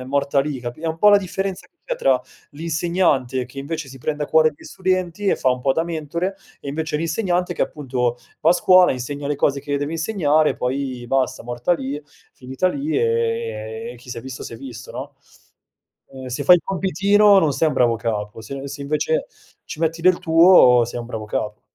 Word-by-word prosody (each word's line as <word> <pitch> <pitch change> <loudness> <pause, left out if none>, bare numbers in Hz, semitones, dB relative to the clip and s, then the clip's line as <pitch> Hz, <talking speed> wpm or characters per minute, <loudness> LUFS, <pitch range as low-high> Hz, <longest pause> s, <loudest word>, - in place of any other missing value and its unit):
è - - -8
morta 140 +1 +1
lì, 140 -1 -3
capi 120 +4 -7
è 165 - -4
un 160 0 -3
pò 210 - +6
la 205 - +8
differenza 195 0 -4
che - - -59
c'è - - -2
tra 130 -2 +2 0.3
l'insegnante 155 -5 0
che 135 +2 -12
invece 155 0 -5
si 135 0 -11
prende 150 +2 -2
a - - -9
cuore 155 0 +4
gli - - -17
studenti, 185 +1 -2
e - - +3
fa 130 - +1
un 125 0 -1
pò 135 +1 +2
da 165 +3 0
mentore, 170 +3 -3 0.3
e - - -8
invece 155 +1 -2
l'insegnante 175 +2 -1
che, - - 0
appunto, 125 -4 -2 0.2
va 160 - +4
a - - +7
scuola 185 +1 +5
insegna 140 +3 -5
le 145 - -1
cose 140 -1 +1
che 145 0 -2
deve 145 +2 -3
insegnare, 160 -3 +1
poi 130 -1 -3
basta 135 +1 0
morta 120 +7 -1
lì, 140 -2 -3 0.3
finita 130 +7 -3
lì, 285 +9 -2
e - - +1 0.8
e - - -5
e - - -13
chi 125 - -18
s'è 115 - -5
visto 130 +1 -8
s'è 115 - -8
visto, 120 -2 -9
no - - -7 1.0
ehm, 130 -1 -9
se 125 - -3
fai 180 - +8
il 170 - -6
compitino 200 +2 +4
non 155 -6 +2
sei 160 +4 +2
un 150 - -3
bravo 120 -3 +3
capo, 105 -2 -4
se 135 +5 -7
se 140 +1 -8
invece 475 - -1 0.4
ci - - -8
metti 165 0 0
del 185 0 +4
tuo 165 -8 +6
sei 120 - -6
un 120 - -8
bravo 110 -3 -6
capo. 105 0 -3
145 Hz, 210 wpm, -21 LUFS, 130-175 Hz, 1.0 s, la